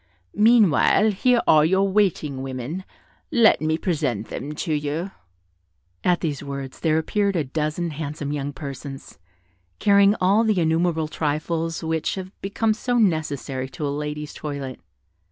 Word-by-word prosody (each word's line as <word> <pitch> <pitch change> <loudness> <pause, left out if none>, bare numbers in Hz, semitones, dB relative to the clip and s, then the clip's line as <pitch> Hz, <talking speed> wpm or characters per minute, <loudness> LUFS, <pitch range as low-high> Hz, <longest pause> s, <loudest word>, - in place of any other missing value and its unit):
Meanwhile, 215 -1 +4
here 240 +4 +2
are 155 -1 +6
your 190 +5 +3
waiting 185 -9 0
women: 135 +8 -5 0.5
let 235 - +5
me 155 0 +1
present 145 - -2
them 145 +2 -5
to 160 +1 -2
you." 150 +5 -2 0.9
At 180 -1 +2
these 150 -4 -2
words, 140 -2 -6
there 160 -1 +2
appeared 200 +5 0
a 165 - +1
dozen 155 +4 -2
handsome 150 -1 -5
young 145 -1 -3
persons, 140 - -8 0.6
carrying 200 0 +5
all 195 +5 +4
the 215 -4 +2
innumerable 160 -1 +1
trifles 160 +2 -2
which 160 -1 -1
have 190 -1 -6
become 215 +3 0
so 245 +2 -1
necessary 145 - 0
to 135 +3 -5
a 140 - -1
lady's 150 0 -5
toilet. 140 -4 -6
160 Hz, 140 wpm, -23 LUFS, 145-190 Hz, 0.9 s, are